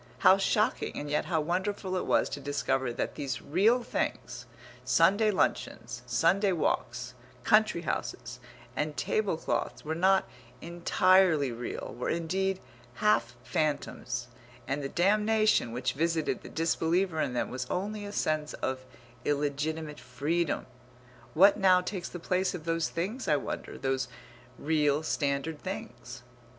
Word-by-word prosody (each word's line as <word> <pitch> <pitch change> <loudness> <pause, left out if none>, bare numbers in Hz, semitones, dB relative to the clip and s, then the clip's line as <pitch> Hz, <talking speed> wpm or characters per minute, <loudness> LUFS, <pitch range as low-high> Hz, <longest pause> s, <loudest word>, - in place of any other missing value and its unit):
How 190 - +8
shocking, 215 +4 +1
and 145 0 -4
yet 150 - +1
how 160 -3 0
wonderful 185 +3 -2
it 185 - -2
was - - +3
to 145 - -5
discover 135 -2 -1
that - - -3
these 140 -4 -3
real 215 - +2
things, - - -3 0.4
Sunday 215 +3 +4
luncheons, 125 - -1
Sunday 180 - +3
walks, 125 -6 -1 0.3
country 215 - +4
houses, 170 - -4 0.4
and 150 0 -2
tablecloths 190 -9 -1
were 155 - -1
not 190 +3 +3 0.3
entirely 170 -3 +3
real, 120 +1 -5
were 125 - -3
indeed 185 +3 -1 0.4
half 120 - +2
phantoms, 140 -5 -2 0.4
and 140 +2 -1
the 135 - -3
damnation 210 - +3
which 125 +1 -1
visited 165 +1 0
the - - -10
disbeliever 165 +1 +1
in 135 -4 -1
them 120 - -1
was 125 0 -4
only 205 +3 -2
a 205 - -6
sense 155 -5 -1
of 130 0 -3 0.4
illegitimate 150 +2 -2
freedom. 155 +6 -1 0.7
What 195 +6 +7
now 185 -2 +6
takes 180 0 -4
the - - -7
place 180 +2 0
of 165 -3 -8
those 165 0 0
things 210 +10 -3
I 150 - +4
wonder, 145 - -4
those 135 -1 -1 0.5
real 150 -1 +1
standard 145 0 -1
things? 125 - -7
160 Hz, 135 wpm, -29 LUFS, 140-185 Hz, 0.7 s, How